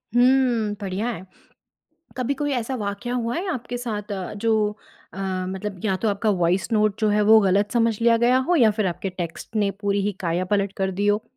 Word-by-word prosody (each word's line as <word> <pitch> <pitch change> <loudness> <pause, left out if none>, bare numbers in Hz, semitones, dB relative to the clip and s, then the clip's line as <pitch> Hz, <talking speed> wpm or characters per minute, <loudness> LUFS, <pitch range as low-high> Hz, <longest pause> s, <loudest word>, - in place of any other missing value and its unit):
हुँ। 245 -4 +3
बढ़िया 195 +3 -2
है। 190 -6 -6 0.9
कभी 255 +2 -1
कोई 290 +1 -2
ऐसा 245 +1 -2
वाकया 210 +3 -4
हुआ 235 -1 -1
है 370 +3 -3
आपके 245 0 -5
साथ 210 -4 -4
अ, 190 -2 -4
जो 215 -1 +1 0.4
अ, 195 - -10 0.3
मतलब 190 0 -5
या 190 -3 +1
तो 220 - -1
आपका 210 +2 0
वॉइस 175 +5 +1
नोट 215 -1 +2
जो 215 - +3
है 210 0 +2
वो 220 +1 +7
गलत 200 +1 +2
समझ 230 -3 +2
लिया 230 0 +4
गया 240 +2 +3
हो 355 - +4
या 230 -6 +5
फिर 210 -1 -1
आपके 185 +2 -3
टेक्स्ट 180 +4 -6
ने 205 -2 +2
पूरी 200 -1 0
ही 205 +1 0
काया 175 0 -1
पलट 200 -1 +1
कर 190 0 0
दी 205 - +1
हो? 205 +1 +2
210 Hz, 210 wpm, -23 LUFS, 200-235 Hz, 0.9 s, वो